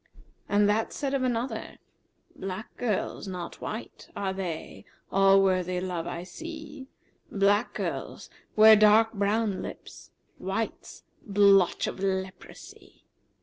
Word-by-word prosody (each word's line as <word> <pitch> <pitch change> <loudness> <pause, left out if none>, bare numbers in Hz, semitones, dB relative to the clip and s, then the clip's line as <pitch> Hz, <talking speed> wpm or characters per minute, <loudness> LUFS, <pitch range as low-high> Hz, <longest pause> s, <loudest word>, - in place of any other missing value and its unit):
And 205 0 +4
that 215 +2 0
said 275 -1 -3
of 275 - +1
another, 250 0 -2 0.6
'Black[FN#363] 195 +3 -5
girls, 215 -3 -2
not 180 -2 -7
white, 220 +2 -7
are 195 -1 -2
they 180 -4 -6
* - - -38
All 195 0 +5
worthy 185 -1 +1
love 180 -2 -4
I 170 - -5
see: 310 - -9 0.4
Black 205 +3 +2
girls - - -4 0.3
wear 220 0 +9
dark 215 +1 +5
brown 205 0 0
lips;[FN#364] - - -11
* - - -6
Whites, - - -4 0.2
blotch 200 -2 +4
of - - -5
leprosy.' 190 -1 -6
200 Hz, 125 wpm, -27 LUFS, 190-225 Hz, 0.6 s, wear